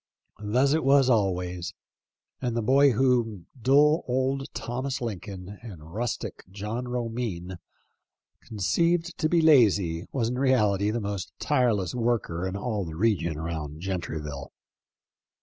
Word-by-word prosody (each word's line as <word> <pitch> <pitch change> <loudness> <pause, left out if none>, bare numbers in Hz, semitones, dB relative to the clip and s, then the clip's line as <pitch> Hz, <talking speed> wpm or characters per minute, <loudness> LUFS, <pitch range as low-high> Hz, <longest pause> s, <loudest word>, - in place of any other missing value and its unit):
Thus 125 +7 +2
it 160 - +1
was 135 -1 +5
always; 90 -5 0 0.7
and 120 -2 -1
the 115 - 0
boy 140 +5 +5
whom 115 -6 +1 0.2
dull 145 +5 +4
old 135 +2 -1
Thomas 130 +3 -3
Lincoln 100 -3 -6
and 85 -8 -11
rustic 120 +3 -3
John 105 +5 -4
Romine 115 -7 -4 0.8
conceived 165 - 0
to 155 - +1
be 170 0 +3
lazy 100 - +4
was 115 -4 0
in 125 +1 -3
reality 105 -7 +2
the 115 +2 -1
most 100 -2 -4
tireless 115 - +1
worker 115 -7 -1
in 95 - -4
all 105 -1 -2
the 80 -3 -7
region 85 -5 +1
around 80 -2 -5
Gentryville. 80 -6 -4
110 Hz, 130 wpm, -27 LUFS, 90-130 Hz, 0.8 s, was